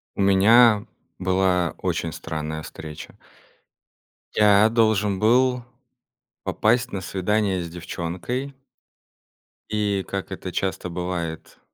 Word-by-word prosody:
У - - -2
меня 105 +3 +5 0.3
была 90 -2 +1
очень 85 - -2
странная 80 -1 -5
встреча. 75 -1 -9 1.2
Я 105 0 +6
должен 110 -4 +2
был 125 +3 +3 0.8
попасть 120 +3 +1
на 95 - -3
свидание 95 0 0
с 85 - -7
девчонкой. 90 +11 -5 1.2
И, 105 -2 0
как 100 -1 -5
это 95 -1 -6
часто 95 0 -2
бывает, 85 -2 -5
95 Hz, 95 wpm, -23 LUFS, 90-110 Hz, 1.2 s, Я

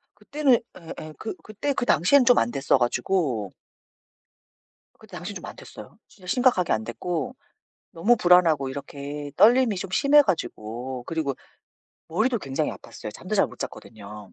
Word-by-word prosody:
그때는 265 +4 +2 0.4
예예. 155 0 -9
그 220 - -4
그때 220 +7 -3
그 245 - -2
당시에는 245 - +4
좀 245 0 +6
안됐어 135 +4 +2
가지고 120 - 0 1.5
그 - - -16
당시에는 - - -7
좀 - - -9
안 - - -9
됐어요. 105 - -12
진짜 185 -3 -17
심각하게 245 -5 +2
안 110 - -1
됐고 175 - -4 0.6
너무 215 +9 +3
불안하고 170 -7 +4
이렇게 145 +1 -7
떨림이 235 -2 +5
좀 185 +1 -5
심해 290 +7 +5
가지고 125 - -4
그리고 155 -5 -2 0.7
머리도 220 +8 +1
굉장히 135 -6 -2
아팠어요. - - -9
잠도 - - -5
잘 - - +4
못 - - -14
잤거든요. 105 -2 -9
165 Hz, 325 characters per minute, -25 LUFS, -, 1.5 s, 좀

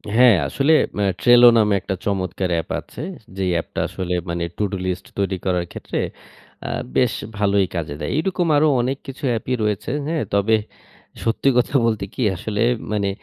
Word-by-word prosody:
হ্যাঁ, 125 -3 +7
আসলে 140 - +2 0.3
আ - - +2 0.2
ট্রেলো 120 0 +8
নামে 105 -2 +3
একটা 95 - -3
চমৎকার 95 -2 -1
অ্যাপ 80 - -3
আছে। - - -10 0.4
যে 95 - -1
অ্যাপটা 85 -1 -2
আসলে 90 -1 -4 0.2
মানে 85 0 -2
টুডু 100 -2 -1
লিস্ট 90 +1 -3
তৈরি 100 -1 0
করার 90 -2 +1
ক্ষেত্রে - - -4 0.7
আ - - -3 0.3
বেশ 125 -2 +3 0.2
ভালোই 100 -2 +2
কাজে 75 -4 -3
দেয়। 75 - -3
এরকম 175 0 0
আরো 155 - +4
অনেক 130 +2 -1
কিছু 135 +2 -9
অ্যাপই 115 +2 -2
রয়েছে। 105 +1 -1 0.2
হ্যাঁ, 160 -2 -1
তবে 100 +2 +3 0.7
সত্যি 115 +4 +2
কথা 125 +3 +1
বলতে 110 -4 0
কি - - -5
আসলে 105 +4 -3 0.3
মানে 100 -2 0
105 Hz, 170 wpm, -21 LUFS, 95-125 Hz, 0.7 s, ট্রেলো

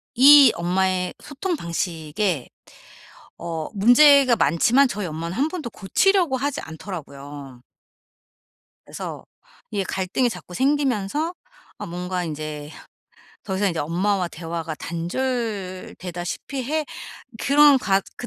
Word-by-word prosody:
이 275 0 +9
엄마의 180 +1 0
소통 345 +5 -3
방식에 170 - -2 0.9
어 165 -2 -5
문제가 255 +4 +6
많지만 230 - +3
저희 210 -4 -4
엄마는 165 +3 -5
1 280 +4 +2
번도 315 -7 -5
고치려고 350 - +2
하지 280 +2 -2
않더라고요. 145 -6 -9 1.2
그래서 - - -7 0.5
이게 205 -2 -1
갈등이 190 +7 -1
자꾸 180 - -9
생기면서 275 - 0 0.4
아 - - -6
뭔가 180 +1 -4
인제 150 -2 -6 0.7
더 190 -2 -3
이상 200 +1 +2
인제 170 - -3
엄마와 180 +4 0
대화가 165 -1 -5
단절되다시피 185 - -4
해 310 +4 -1 0.5
그런 285 0 +6
가 195 -5 +2 0.2
그 245 - -7
190 Hz, 245 characters per minute, -23 LUFS, 170-265 Hz, 1.2 s, 이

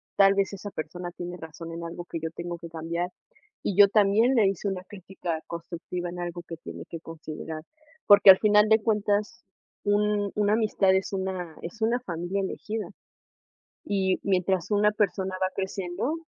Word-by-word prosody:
tal 195 -1 +6
vez 200 0 0
esa 200 +1 -7
persona 175 +2 -5
tiene 175 0 -7
razón 165 0 -9
en 170 +1 -6
algo 170 +1 -6
que 165 - -5
yo 160 0 -3
tengo 175 0 -5
que 170 0 -9
cambiar, 165 +2 -3 0.5
y 200 - -1
yo 205 -1 +9
también 215 +5 +4
le 220 -5 +5
hice 195 +1 -2
una 190 -2 -3
crítica 185 -4 -5
constructiva 170 +1 -5
en 175 +1 -7
algo 175 0 -4
que 165 - -6
tiene 165 - -8
que 165 - -6
considerar, 160 -1 -7 0.5
porque 205 -1 +10
al 190 - +5
final 210 0 +5
de 220 0 +6
cuentas 210 +1 0 0.4
un 205 0 +1
una 210 0 +2
amistad 210 -3 +3
es 190 +1 -1
una 185 -4 -3
es 195 +7 -8
una 235 +3 +2
familia 175 -1 -3
elegida, 210 +1 -4 1.0
y 190 -2 +1
mientras 185 -1 +1
una 210 0 +4
persona 195 -2 0
va 185 - +3
creciendo, 190 - -2
190 Hz, 175 wpm, -27 LUFS, 175-205 Hz, 1.0 s, porque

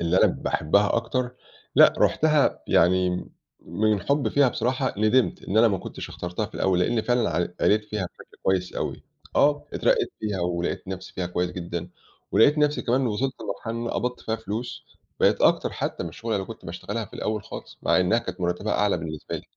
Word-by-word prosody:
اللي 85 +2 +1
أنا - - +6
باحبها 100 +8 +1
أكتر، 125 +2 -1 0.4
لأ - - +8
رُحتها 155 -2 +3
يعني 90 +1 +2 0.3
من 105 +4 0
حُبي 140 0 +1
فيها 140 -2 +4
بصراحة 130 +2 -1
ندمت 110 +4 +2
إن 105 +4 0
أنا 115 - +7
ما 95 -4 0
كُنتش - - -7
اخترتها 90 +4 -4
في 110 - -18
الأوّل، 95 -2 +1
لإني 110 +5 +1
فعلًا 120 -5 +1
ع 85 - +2 0.2
قريت 105 0 +3
فيها 105 -2 -3
بشكل - - -17
كويّس 95 -1 0
أوي، - - -4 0.3
آه 145 0 +3
اترقيت 455 -7 +1
فيها 100 -4 -2
ولقيت 90 +2 -2
نفْسي 95 -1 -6
فيها 90 -1 -3
كويّس 90 0 -1
جدًا، 85 -1 -5 0.4
ولقيت 145 +7 +5
نفْسي 150 0 +2
كمان 125 +2 +2
إن 130 - +1
وصلت 125 +5 -1
لمرحلة 115 - -4
إن 115 - -3
أنا 120 - -2
قبضت 125 0 -2
فيها 110 - -2
فلوس، 110 +2 -5 0.4
بقيت - - +4
أكتر - - +3
حتّى - - -3
من 85 - -4
الشُغلة 115 +6 -4
اللي 95 -1 -3
كنت 115 0 -10
باشتغلها 105 +6 -4
في - - -17
الأوّل 105 -1 -2
خالص - - -9
مع - - +3
إنّها 90 +5 +3
كانت 95 -5 -6
مرتبها 90 +4 -1
أعلى 105 -4 +2
بالنسبة 80 -2 -5
لي. - - -9
105 Hz, 195 wpm, -25 LUFS, 90-120 Hz, 0.4 s, لأ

